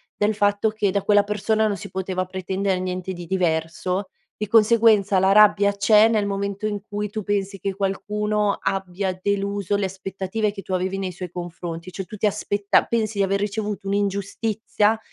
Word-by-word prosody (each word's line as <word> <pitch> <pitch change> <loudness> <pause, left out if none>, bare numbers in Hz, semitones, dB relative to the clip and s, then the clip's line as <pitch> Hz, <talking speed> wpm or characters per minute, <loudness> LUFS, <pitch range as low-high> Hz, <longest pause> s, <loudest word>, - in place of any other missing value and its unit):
del 210 +1 +1
fatto 205 +1 +2
che 215 -2 0
da 200 0 0
quella 205 0 +4
persona 215 +1 +1
non 205 -2 -1
si 170 - -9
poteva 185 0 -2
pretendere 190 +1 -2
niente 185 0 -3
di 175 -1 -8
diverso. 180 +2 -1 0.3
E 210 - -4
conseguenza, 215 -2 +4
la 190 +1 +3
rabbia 205 -1 +6
c'è 210 +2 +5
nel 220 -2 +1
momento 200 +1 -3
in 205 -2 -2
cui 210 -1 -5
tu 215 - -3
pensi 200 -1 -2
che 195 0 -3
qualcuno 210 +1 -1
abbia 190 0 -2
deluso 200 0 -1
le 200 -1 0
aspettative 190 +2 -3
che 200 -1 -9
tu 190 - -5
avevi 185 +1 -1
nei 190 -1 -3
suoi 180 0 -7
confronti. 175 0 -6
Ciò, 190 - -5
tu 215 - -9
ti 210 - 0
aspetta 205 0 +2
pensi 220 -3 -1
di - - +4
aver 195 +1 +1
ricevuto 205 0 -3
un'ingiustizia 205 +2 0
200 Hz, 180 wpm, -23 LUFS, 190-210 Hz, 0.3 s, rabbia